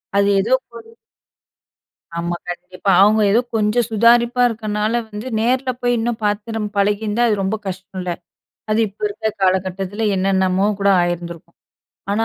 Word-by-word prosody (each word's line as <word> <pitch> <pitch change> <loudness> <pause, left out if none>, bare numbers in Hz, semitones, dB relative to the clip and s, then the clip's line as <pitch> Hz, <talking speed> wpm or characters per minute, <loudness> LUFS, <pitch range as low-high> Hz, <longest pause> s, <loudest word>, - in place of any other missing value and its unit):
அது 200 0 +3
ஏதோ 225 +6 +1 0.2
ஒரு 225 -1 -13 1.3
ஆமா 170 +1 -2
கண்டிப்பா. 180 +2 -3
அவங்க 215 +2 +5
ஏதோ 220 - +4 0.2
கொஞ்சம் 220 +2 +1
சுதாரிப்பா 235 +3 +4
இருக்கனால, 215 -1 -2 0.2
வந்து 210 +3 -7
நேர்ல 255 +3 +1
போய் 245 0 +2
இன்னும் 230 0 -2
பாத்து 210 +2 -2
நம் 210 -1 -2
பழகியிருந்தா. 210 +3 +1
அது 215 - +2
ரொம்ப 190 +3 0
கஷ்ட்டோல்ல, 185 -1 -5 0.6
அது 215 - +2
இப்போ 200 +2 -19
இருக்க 220 +2 -3
காலகட்டத்தில 190 +3 0
என்னென்னமோ 190 0 +1
கூட 200 - +2
ஆயிருந்திருக்கும். 170 -1 -4 0.5
ஆனா 215 +3 +1
210 Hz, 135 wpm, -19 LUFS, 190-225 Hz, 1.3 s, அவங்க